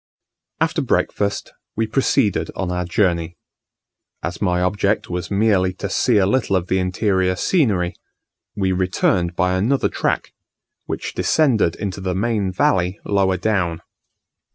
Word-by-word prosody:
After - - +1
breakfast 100 -1 -1 0.2
we 110 - +1
proceeded 115 -2 +1
on 95 -2 -2
our 90 0 -2
Journey. 85 -2 0 0.9
As 85 +1 -4
my 90 -3 +1
object 100 +2 0
was 90 -1 -3
merely 100 -3 +2
to 95 +1 -5
see 120 +3 +2
a 95 - +4
little 105 -1 +1
of 90 -1 -1
the 95 - +2
interior 95 0 +1
scenery, 100 - +1 0.6
we 95 -2 0
returned 90 -1 +1
by 90 +1 +1
another 120 +9 +1
track, - - -2 0.5
which - - -4
descended 120 - +2
into 100 -1 -5
the 95 -1 -2
main 105 -2 0
valley 90 +1 +1
lower 95 -2 +1
down. 90 -4 -1
95 Hz, 135 wpm, -20 LUFS, 90-105 Hz, 0.9 s, a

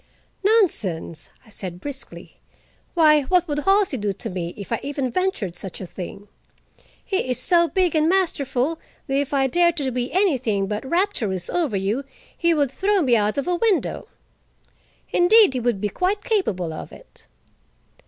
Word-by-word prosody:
"Nonsense!" 225 - +1 0.2
I - - -19
said 180 -3 -5
briskly. 275 +5 -9 0.6
"Why, 305 -3 +5
what 360 +4 +2
would 295 -1 -1
Halsey 390 -3 +2
do 205 -2 -1
to - - -6
me 175 -2 -4
if 200 - -9
I 230 - 0
even 275 -3 -3
ventured 300 - -1
such 185 0 -8
a 190 - -6
thing? 190 +3 -8 0.8
He 380 -9 -1
is 250 - +1
so 340 -2 +4
big 365 -2 +1
and 310 +1 +3
masterful 315 -5 0 0.3
that 270 - -4
if 285 - -5
I 275 -2 +2
dared 345 +5 +2
to 270 -3 -1
be 250 +1 -2
anything 260 - +1
but 210 +2 -3
rapturous 235 - -1
over 310 - 0
you, 205 +8 -1 0.3
he 340 -1 +2
would 290 -5 +1
throw 390 +4 +1
me 250 -4 +3
out 210 +1 +1
of 280 - -2
a 360 - +1
window. 400 +1 0 1.0
Indeed, 405 -2 +6
he 255 - -1
would 235 -4 0
be 210 +1 -1
quite 385 - -1
capable 190 - -1
of - - -8
it." - - -14
275 Hz, 170 wpm, -22 LUFS, -, 1.0 s, Indeed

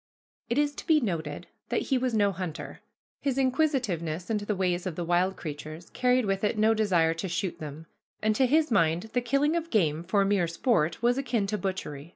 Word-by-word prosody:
It - - 0
is 290 0 +2
to - - -8
be 315 -2 +5
noted 165 - -3 0.2
that - - 0
he 265 - +1
was 250 -2 0
no 205 -2 +3
hunter. 180 -4 -6 0.4
His 275 -2 -1
inquisitiveness 245 - 0
into 210 -1 -2
the 210 - 0
ways 180 -1 0
of 175 - -4
the 175 - -3
wild 180 +3 +2
creatures 155 +2 -7
carried 250 -1 +2
with 195 0 -1
it 210 +1 +1
no 220 +1 +4
desire 180 -7 +2
to 165 +3 -4
shoot 180 +1 -2
them, 155 +1 -8 0.3
and 215 0 +1
to 260 +3 +3
his 305 +1 +2
mind 170 +1 +2
the 245 - +2
killing 275 +6 +1
of 335 -1 -2
game 165 - +1
for 195 +3 +2
mere 195 -3 +2
sport 170 0 0
was 245 +2 +3
akin 235 -6 0
to 210 +2 -2
butchery. 170 -6 -4
200 Hz, 205 wpm, -28 LUFS, 170-245 Hz, 0.4 s, be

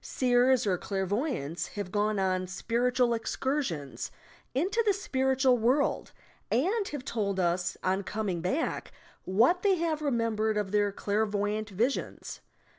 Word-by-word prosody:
Seers 250 -1 +3
or 185 -4 +1
clairvoyants 195 - -2
have 200 -3 -4
gone 210 +1 +1
on 185 -1 0
"spiritual 240 +5 +1
excursions" 225 - -2 0.5
into 380 - +1
the 415 -2 +3
spiritual 265 -8 +2
world, 255 +6 +1 0.4
and 390 - +1
have 285 -3 -6
told 200 -6 -1
us, 180 0 0
on 190 +1 +1
coming 200 -3 -3
back, 265 - -2 0.3
what 235 - +3
they 400 -2 +4
have 330 -3 -1
remem 235 -7 0
bered 215 0 +1
of 200 -2 -3
their 205 -1 +2
clairvoyant 210 +1 -1
visions. 230 +8 -2
220 Hz, 130 wpm, -29 LUFS, 195-265 Hz, 0.5 s, they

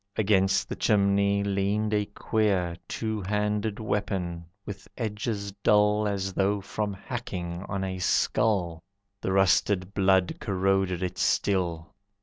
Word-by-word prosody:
Against 95 -2 +2
the - - -4
chimney 100 0 +2
leaned 100 +2 0
a 105 -1 +1
queer 100 -5 0
Two 110 -2 -3
handed 105 +2 -1
weapon, 95 -5 -2 0.2
with 100 0 -8
edges 105 -2 -3
dull 105 +1 +3
As 95 -1 -2
though 100 +2 +1
from 105 +1 -3
hacking 95 -5 -5
on 100 -1 -2
a 95 -1 -3
skull. 90 -2 +1 0.4
The 95 - -1
rusted 95 0 +2
blood 95 -2 +2
corroded 95 -2 0
it 90 0 -4
still. 85 -4 0
100 Hz, 125 wpm, -27 LUFS, 95-105 Hz, 0.4 s, dull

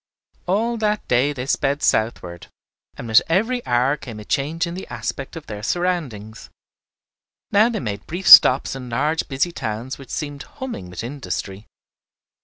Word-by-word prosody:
All 225 +6 0
that 210 -1 -1
day 125 +4 +2
they 130 -3 -5
sped 140 +1 0
southward, 90 -6 -1 0.5
and 120 - -7
with 110 -1 +6
every 225 +8 +1
hour 125 +4 +2
came 115 -7 -9
a 105 - -10
change 155 - -1
in 170 - -6
the 185 - -7
aspect - - -5
of 160 -2 -8
their 105 -1 -7
surroundings. 130 - -3 1.0
Now 215 +3 +5
they 235 - -3
made 100 -4 -5
brief 180 +3 -5
stops 130 +1 +8
in 130 -2 -8
large 150 +7 0
busy 140 +5 -1
towns 120 -1 -5
which 135 - -12
seemed 145 -2 -5
humming 255 - -7
with 90 +4 -7
industry. 115 -6 -6
140 Hz, 160 wpm, -21 LUFS, 115-175 Hz, 1.0 s, stops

